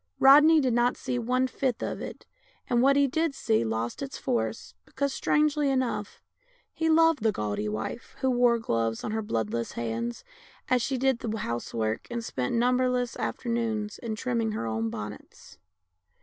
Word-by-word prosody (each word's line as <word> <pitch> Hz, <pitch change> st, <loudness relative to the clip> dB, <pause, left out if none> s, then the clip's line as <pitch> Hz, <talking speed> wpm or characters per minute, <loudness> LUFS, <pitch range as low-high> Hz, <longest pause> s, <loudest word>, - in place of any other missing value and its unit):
Rodney 300 Hz, +4 st, +7 dB
did 260 Hz, -4 st, +1 dB
not 240 Hz, +1 st, +2 dB
see 245 Hz, -, -2 dB
one 250 Hz, +2 st, +1 dB
fifth 260 Hz, -2 st, -2 dB
of -, -, -3 dB
it, -, -, -8 dB, 0.4 s
and 240 Hz, -1 st, +2 dB
what 275 Hz, +2 st, +5 dB
he 280 Hz, 0 st, +5 dB
did 315 Hz, +2 st, 0 dB
see 220 Hz, -, +1 dB
lost 115 Hz, +1 st, -3 dB
its 275 Hz, -1 st, -5 dB
force, 110 Hz, -5 st, -2 dB
because, 280 Hz, -, -2 dB
strangely 300 Hz, -1 st, +2 dB
enough, 235 Hz, -6 st, -2 dB, 0.5 s
he 320 Hz, 0 st, 0 dB
loved 325 Hz, -3 st, +4 dB
the 220 Hz, 0 st, +3 dB
gaudy 105 Hz, -, -2 dB
wife 110 Hz, -, -5 dB
who 265 Hz, -1 st, +2 dB
wore 245 Hz, -1 st, +4 dB
gloves 115 Hz, -, -1 dB
on -, -, -3 dB
her 220 Hz, 0 st, -1 dB
bloodless 115 Hz, -, -2 dB
hands 115 Hz, 0 st, -3 dB, 0.5 s
as 255 Hz, -1 st, +3 dB
she 265 Hz, +3 st, -1 dB
did 260 Hz, -1 st, +1 dB
the 220 Hz, -1 st, -3 dB
house 120 Hz, -, -4 dB
work 110 Hz, -1 st, -2 dB
and 235 Hz, -1 st, -4 dB
spent 125 Hz, -, -2 dB
numberless 250 Hz, 0 st, +1 dB
afternoons 225 Hz, -3 st, -2 dB
in 225 Hz, -2 st, -4 dB
trimming 230 Hz, -2 st, -1 dB
her 115 Hz, -, -3 dB
own 110 Hz, 0 st, -1 dB
bonnets. 105 Hz, -1 st, -9 dB
235 Hz, 170 wpm, -27 LUFS, -, 0.5 s, Rodney